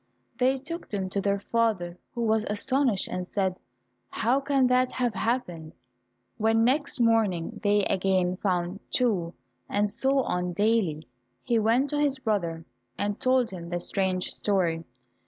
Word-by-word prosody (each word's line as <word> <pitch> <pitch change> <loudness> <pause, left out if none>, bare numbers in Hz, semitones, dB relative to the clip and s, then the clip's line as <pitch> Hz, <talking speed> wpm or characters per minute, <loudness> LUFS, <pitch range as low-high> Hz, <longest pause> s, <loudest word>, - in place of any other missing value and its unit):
They 260 +2 +3
took 335 +6 -7
them 190 -3 -3
to 200 - -1
their 200 0 +1
father, 200 -6 0 0.2
who 235 - -1
was 220 -1 +2
astonished 230 +1 +1
and 180 - -3
said, 190 -2 -1 0.5
"How 250 +4 +1
can 275 -1 +2
that 250 0 +3
have 245 -3 0
happened?" 180 -8 -2 0.6
When 225 +1 +3
next 275 +3 +1
morning 225 -4 +1
they 205 -2 +3
again 185 -1 +1
found 180 -1 -1
two, 195 -9 +1 0.3
and 205 +1 +1
so 270 +6 +1
on 180 -3 -2
daily, 195 -6 +1 0.4
he 235 -1 +2
went 235 +6 +2
to 295 - 0
his 285 -2 +2
brother 175 -10 -2 0.3
and 205 0 -2
told 255 -3 +2
him 170 -2 -7
the 175 0 -2
strange 185 0 -1
story. 170 -5 0
210 Hz, 150 wpm, -27 LUFS, 185-250 Hz, 0.6 s, They